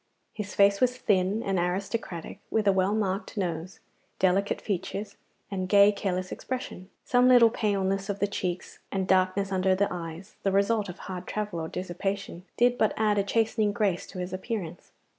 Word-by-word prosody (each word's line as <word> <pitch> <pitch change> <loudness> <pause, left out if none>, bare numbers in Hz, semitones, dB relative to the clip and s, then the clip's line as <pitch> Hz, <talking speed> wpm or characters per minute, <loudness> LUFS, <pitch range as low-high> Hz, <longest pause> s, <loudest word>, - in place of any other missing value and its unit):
His 205 -2 -6
face 200 0 +4
was 250 0 +3
thin 200 0 +1
and 195 -2 0
aristocratic, 180 0 -3
with 220 -2 +1
a - - +7
well 190 +2 +2
marked 200 0 -2
nose, 175 -1 -3 0.4
delicate 190 +2 +2
features, 200 +1 -4 0.4
and 185 -2 -3
gay 200 +1 +7
careless 185 -2 -2
expression. 225 -7 -5 0.2
Some 250 0 +4
little 245 -3 +7
paleness 195 -3 0
of 200 - -1
the 205 - +1
cheeks 185 -3 -4
and 190 -1 -1
darkness 190 +1 +2
under 190 0 +2
the 200 +2 +2
eyes, 170 +3 -7
the 195 - +1
result 200 +1 +2
of 180 - -7
hard 185 -1 -7
travel 210 -5 -3
or 160 - -3
dissipation, 185 +1 -4
did 245 0 +3
but 215 - +2
add 210 -1 +2
a - - +2
chastening 215 0 +1
grace 200 -5 0
to 195 - -10
his 180 0 -4
appearance. 185 -4 -5
195 Hz, 175 wpm, -27 LUFS, 185-210 Hz, 0.4 s, a